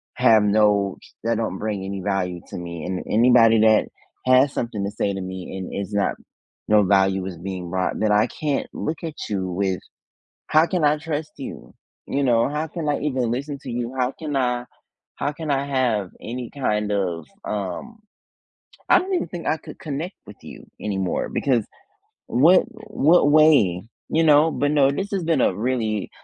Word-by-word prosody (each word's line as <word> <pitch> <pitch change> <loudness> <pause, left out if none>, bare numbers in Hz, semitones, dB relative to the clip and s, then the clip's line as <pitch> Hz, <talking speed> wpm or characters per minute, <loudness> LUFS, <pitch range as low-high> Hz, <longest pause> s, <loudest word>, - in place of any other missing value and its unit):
have 110 -2 +5
no 105 -1 +2 0.3
that 115 -1 0
don't 110 -5 -2
bring 105 -3 -3
any 100 0 -4
value 90 -3 -2
to - - -6
me. 85 -2 -6
And 90 0 -3
anybody 115 -1 +5
that 110 -1 +5 0.4
has 130 +2 +5
something 115 -4 -3
to 100 - -3
say 100 -1 -1
to 95 - -4
me 95 0 -6
and 95 -1 -6
is 100 0 -4
not 100 -1 +1 0.5
no 105 -1 +5
value 95 -1 +2
is 95 -3 -6
being 90 0 -6
brought, 95 +1 -1
then 110 -1 +2
I 105 +3 +4
can't 145 +3 -2
look 155 +1 -4
at 160 -2 -5
you 95 -3 -1
with 95 0 -1 0.7
"How 155 +1 +5
can 180 -2 -1
I 150 +1 +4
trust 155 0 -4
you?" 135 - -9 0.3
You 140 - -1
know, 115 0 +3
"How 150 +2 -2
can 160 -2 -4
I 145 - 0
even 130 -5 -1
listen 140 +4 -3
to 130 - -5
you? 120 +1 -3
How 125 +1 +1
can 150 -3 -4
I 125 -2 0 0.5
how 145 - -2
can 155 0 -6
I 140 0 0
have 120 -9 0
any 120 +1 -5
kind 105 -7 -1
of, 90 -5 -2 0.2
um, 105 - -4 0.9
I - - +7
don't 380 +1 -4
even 360 - 0
think 175 -2 -6
I - - +2
could - - -12
connect 155 +5 -5
with 105 - -11
you - - -11 0.2
anymore," 95 -3 -2
because 120 -6 +1 0.6
what 165 +9 +5 0.3
what 155 -4 +4
way, 145 - +5 0.3
you 165 +1 +2
know, 155 +1 +5
but 145 +3 0
no, 140 -2 +4
this 195 +8 -3
has 195 -4 -1
been 160 -5 +2
a - - +2
really, 110 -3 -1
115 Hz, 185 wpm, -23 LUFS, 100-145 Hz, 0.9 s, I